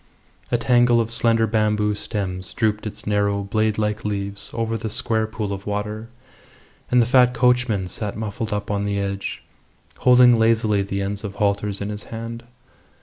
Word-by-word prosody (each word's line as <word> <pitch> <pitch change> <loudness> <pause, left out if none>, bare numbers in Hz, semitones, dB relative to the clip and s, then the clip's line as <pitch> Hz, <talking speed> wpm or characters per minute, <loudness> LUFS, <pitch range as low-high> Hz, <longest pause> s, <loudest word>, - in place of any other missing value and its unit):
A 120 - +3
tangle 120 0 +4
of 115 0 -1
slender 115 -1 +3
bamboo 105 -1 +1
stems 95 -3 -4
drooped 110 -2 0
its 105 - -8
narrow, 100 -1 +1
blade 110 +2 0
like 105 +1 -1
leaves 100 0 -3
over 115 -1 -2
the 110 0 -4
square 110 -2 0
pool 110 -2 -4
of 100 +1 -7
water, 105 +2 -4 0.8
and 125 - +4
the 120 - +4
fat 125 0 +4
coachman 120 -6 +2
sat 100 +3 -4
muffled 110 +1 -4
up 105 +1 -3
on 100 0 -1
the 100 0 -1
edge, 100 0 -4 0.6
holding 125 -2 +6
lazily 110 -2 +3
the 100 0 -2
ends 100 +2 -4
of 100 -1 -6
halters 100 -1 0
in 100 - -3
his 105 0 -6
hand. 115 +1 -7
105 Hz, 170 wpm, -22 LUFS, 100-115 Hz, 0.8 s, holding